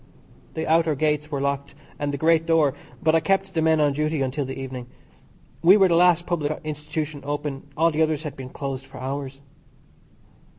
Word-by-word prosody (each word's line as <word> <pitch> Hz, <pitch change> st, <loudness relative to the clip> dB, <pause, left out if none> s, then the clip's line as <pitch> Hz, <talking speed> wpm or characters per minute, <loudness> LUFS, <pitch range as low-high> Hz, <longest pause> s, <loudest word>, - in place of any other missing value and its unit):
The 160 Hz, -, -2 dB
outer 160 Hz, -1 st, +3 dB
gates 150 Hz, +1 st, 0 dB
were 145 Hz, -3 st, -2 dB
locked, 140 Hz, 0 st, -2 dB, 0.2 s
and 145 Hz, -1 st, -1 dB
the 140 Hz, -, -3 dB
great 165 Hz, +2 st, +3 dB
door, 160 Hz, -4 st, +3 dB, 0.3 s
but 155 Hz, -, +4 dB
I 165 Hz, -, +5 dB
kept 195 Hz, +3 st, 0 dB
the 165 Hz, -, +1 dB
men 160 Hz, 0 st, +3 dB
on 145 Hz, -2 st, +3 dB
duty 150 Hz, 0 st, 0 dB
until 135 Hz, +2 st, -2 dB
the 135 Hz, +1 st, -6 dB
evening. 130 Hz, -2 st, -6 dB, 0.7 s
We 180 Hz, +5 st, +7 dB
were 190 Hz, -2 st, +5 dB
the 170 Hz, -, +3 dB
last 175 Hz, 0 st, +4 dB
public 155 Hz, -3 st, -1 dB
institution 150 Hz, -1 st, -4 dB
open; 145 Hz, -1 st, -4 dB
all 165 Hz, +2 st, +4 dB
the 155 Hz, +1 st, 0 dB
others 155 Hz, -1 st, +1 dB
had 150 Hz, -3 st, -5 dB
been 130 Hz, -1 st, -8 dB
closed 135 Hz, -1 st, -5 dB
for 135 Hz, 0 st, -12 dB
hours. 135 Hz, +1 st, -5 dB
150 Hz, 195 wpm, -24 LUFS, 140-160 Hz, 0.7 s, We